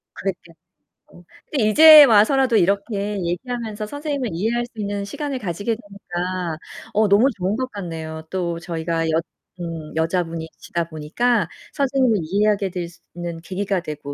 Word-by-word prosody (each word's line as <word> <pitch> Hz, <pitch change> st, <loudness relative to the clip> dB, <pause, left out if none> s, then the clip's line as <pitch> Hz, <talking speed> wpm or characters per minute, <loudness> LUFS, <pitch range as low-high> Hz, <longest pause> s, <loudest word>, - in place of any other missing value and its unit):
그랬겠 175 Hz, -3 st, -5 dB, 0.6 s
어. 175 Hz, -, -15 dB, 0.3 s
근데 235 Hz, -8 st, +2 dB
이제 310 Hz, +5 st, +10 dB
와서라도 250 Hz, +2 st, +4 dB
이렇게 200 Hz, +2 st, 0 dB
얘기하면서 215 Hz, +4 st, -3 dB
선생님을 285 Hz, -1 st, -3 dB
이해할 230 Hz, +7 st, 0 dB
수 240 Hz, -, -18 dB
있는 200 Hz, -1 st, -2 dB
시간을 275 Hz, +5 st, -4 dB
가지게 205 Hz, +3 st, -2 dB
되니까 185 Hz, -5 st, -5 dB, 0.4 s
어 215 Hz, 0 st, +3 dB
너무 205 Hz, +6 st, +5 dB
좋은 190 Hz, +3 st, -1 dB
것 255 Hz, +2 st, -2 dB
같네요. 160 Hz, -5 st, -6 dB
또 170 Hz, -3 st, -2 dB
저희가 165 Hz, -1 st, -2 dB
여 160 Hz, -, +2 dB, 0.4 s
음 165 Hz, -3 st, -6 dB
여자분이시다 165 Hz, 0 st, -2 dB
보니까 185 Hz, +10 st, 0 dB, 0.2 s
선생님을 265 Hz, -5 st, +2 dB
이해하게 200 Hz, +2 st, +1 dB
될 175 Hz, -2 st, -4 dB
수 175 Hz, -, -19 dB, 0.2 s
있는 175 Hz, -1 st, -5 dB
계기가 190 Hz, +2 st, -2 dB
되고 150 Hz, -3 st, -6 dB
200 Hz, 340 characters per minute, -22 LUFS, 170-230 Hz, 0.6 s, 이제